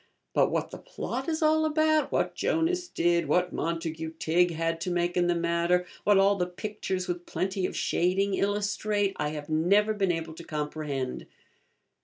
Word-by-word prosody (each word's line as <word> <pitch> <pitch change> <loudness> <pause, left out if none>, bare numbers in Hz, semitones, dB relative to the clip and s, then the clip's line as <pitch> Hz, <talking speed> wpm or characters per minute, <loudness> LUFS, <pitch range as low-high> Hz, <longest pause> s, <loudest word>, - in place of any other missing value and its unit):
But - - +3
what - - -2
the - - -8
plot 260 +5 -5
is 315 0 -1
all 315 0 +4
about, 310 0 +2
what - - 0
Jonas 355 +2 0
did, 170 - +1
what 180 +4 +1
Montagu 165 -1 -3
Tigg 175 +3 +3
had 165 0 -2
to 180 - -2
make 175 0 0
in 175 -1 +2
the 175 - +2
matter, 170 +1 +1 0.2
what 205 -1 +5
all 195 +1 +5
the 180 -1 0
pictures 190 0 -4
with 175 0 -4
plenty 185 +2 -1
of - - -6
shading 195 +3 +1
illustrate, 205 0 0
I 150 - -1
have 150 -1 -6
never 195 +7 +3
been 195 -3 +1
able 165 -1 -4
to 170 - -10
comprehend. 150 -4 -4
180 Hz, 175 wpm, -28 LUFS, 165-205 Hz, 0.2 s, what